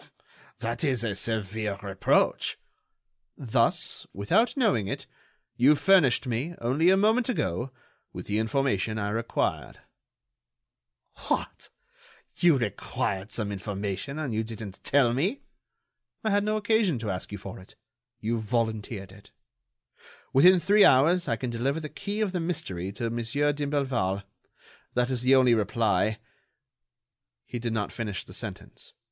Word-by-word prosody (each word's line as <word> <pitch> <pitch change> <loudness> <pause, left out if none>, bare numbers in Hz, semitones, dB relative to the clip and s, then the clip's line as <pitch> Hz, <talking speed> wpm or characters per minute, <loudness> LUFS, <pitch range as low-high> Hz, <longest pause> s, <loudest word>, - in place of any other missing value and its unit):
"That 115 +1 -3
is 130 -6 +1
a 110 -3 -1
severe 105 -1 -2
reproach." 95 -1 +1 0.8
"Thus, 125 -6 0
without 195 - +1
knowing 125 - +2
it, - - -4 0.5
you 135 +5 +6
furnished 150 -5 +4
me, 130 +8 -2
only 135 +9 +2
a 190 - +5
moment 220 +5 +3
ago, 120 - -1 0.4
with - - -8
the 105 +1 -1
information 110 -3 0
I 105 -1 -1
required." 115 +2 -2 1.5
"What! - - -2 0.7
you 170 -5 +5
required 100 -3 -3
some 105 -3 -2
information 100 +6 -4
and 145 -7 -3
you 110 +1 0
didn't 110 -3 -8
tell 135 -4 +3
me?" 185 - -1 0.8
"I 220 - +1
had 205 0 +2
no 215 +1 0
occasion 215 - +2
to 110 -3 -3
ask 90 +1 -5
you 105 - -4
for 95 - -9
it—you 120 +3 -7
volunteered 110 -3 -2
it. 100 +1 -16 1.0
Within 180 +7 +7
three 205 +5 +5
hours 165 +7 +5
I 115 - +1
can 120 +2 -4
deliver 135 +6 -1
the 155 -1 -6
key 205 +6 -4
of 210 -3 0
the 180 - -2
mystery 95 - -3
to 115 +2 -3
Monsieur 120 +6 0
d'Imblevalle. 135 -10 -1 0.7
That 125 +1 +1
is 125 -2 -1
the 130 +2 +5
only 130 -2 +5
reply——" 110 -1 +1 1.3
He 120 - -5
did 115 -1 -2
not 105 -2 -2
finish 105 -4 -4
the - - -13
sentence. - - -7
120 Hz, 140 wpm, -27 LUFS, 105-150 Hz, 1.5 s, Within